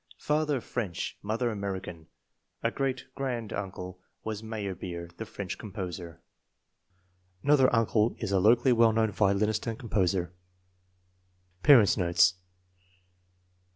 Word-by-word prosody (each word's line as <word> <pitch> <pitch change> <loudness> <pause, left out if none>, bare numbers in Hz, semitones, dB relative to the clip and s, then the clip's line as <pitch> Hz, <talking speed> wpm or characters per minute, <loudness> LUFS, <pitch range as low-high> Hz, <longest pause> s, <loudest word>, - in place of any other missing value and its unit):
Father 150 -3 0
French, 105 -10 -4
mother 115 +3 -1
American. 95 -5 -5 0.6
A 115 - +1
great 135 0 -2
grand 125 -6 -3
uncle 90 -2 -6 0.2
was 110 -1 -4
Meyerbeer, 95 -6 -6
the 110 - -6
French 100 -3 -6
composer. 90 -5 -7 1.2
Another 145 -3 +5
uncle 115 -1 +2
is - - -4
a 95 - +3
locally 120 +6 +5
well 115 -1 +5
known 110 -1 +2
violinist 105 +2 +1
and 115 -1 -2
composer. 95 -7 0 1.3
Parents 125 -9 +6
9 90 - 0
notes. 85 +1 +5
105 Hz, 115 wpm, -29 LUFS, 95-115 Hz, 1.3 s, Parents